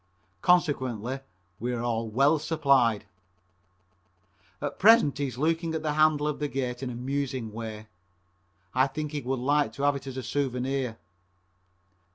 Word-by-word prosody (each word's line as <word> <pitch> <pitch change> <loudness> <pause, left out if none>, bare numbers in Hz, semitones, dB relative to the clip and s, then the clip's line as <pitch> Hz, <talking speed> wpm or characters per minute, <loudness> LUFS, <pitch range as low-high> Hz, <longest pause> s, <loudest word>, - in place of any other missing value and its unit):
Consequently 130 - +1 0.4
we 120 +2 -2
are 115 -1 -1
well 135 +8 +3
supplied. 140 -9 +2 1.5
At - - -4
present 205 - +6
he's 135 -4 -2
looking 165 +3 0
at 160 - -3
the 150 -1 0
handle 155 -1 +3
of 150 - -2
the 150 - -1
gate 125 -3 -3
in 130 - -3
a 120 - -6
musing 130 -2 -3
way. 110 -1 -6 0.9
I 130 +1 +4
think 150 +1 -4
he 150 -2 -3
would 130 +1 -2
like 145 +3 +1
to 140 - -5
have 145 0 +3
it 140 - -7
as 130 -1 -6
a 130 - -4
souvenir. 130 -2 -2
135 Hz, 150 wpm, -27 LUFS, 125-150 Hz, 1.5 s, present